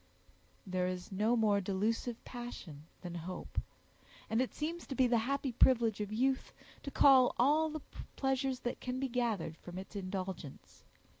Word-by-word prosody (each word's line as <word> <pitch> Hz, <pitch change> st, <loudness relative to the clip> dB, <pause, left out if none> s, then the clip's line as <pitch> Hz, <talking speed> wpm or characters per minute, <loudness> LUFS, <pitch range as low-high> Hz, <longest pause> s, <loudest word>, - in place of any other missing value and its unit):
There 185 Hz, -1 st, 0 dB
is 180 Hz, 0 st, -4 dB
no 215 Hz, +5 st, +2 dB
more 210 Hz, -3 st, +3 dB
delusive 220 Hz, +5 st, -1 dB
passion 190 Hz, -, -8 dB
than 175 Hz, -2 st, -6 dB, 0.2 s
hope; 185 Hz, -, -4 dB, 0.7 s
and 225 Hz, +2 st, +3 dB
it 260 Hz, -, -1 dB
seems 330 Hz, +3 st, -4 dB
to 270 Hz, -, -4 dB
be 260 Hz, -, +4 dB
the 240 Hz, -1 st, +3 dB
happy 275 Hz, -1 st, 0 dB
privilege 230 Hz, -3 st, +4 dB
of 210 Hz, 0 st, -3 dB
youth 260 Hz, +4 st, +1 dB, 0.3 s
to -, -, -5 dB
cull 265 Hz, -2 st, +6 dB
all 300 Hz, +5 st, +4 dB
the 310 Hz, -1 st, -5 dB, 0.3 s
pleasures 265 Hz, -1 st, 0 dB
that 245 Hz, -, -3 dB
can 255 Hz, 0 st, -3 dB
be 270 Hz, -, 0 dB
gathered 220 Hz, -10 st, -1 dB
from 175 Hz, 0 st, -9 dB
its 190 Hz, +2 st, -8 dB
indulgence. 185 Hz, -6 st, -6 dB
235 Hz, 160 wpm, -34 LUFS, 190-260 Hz, 0.7 s, cull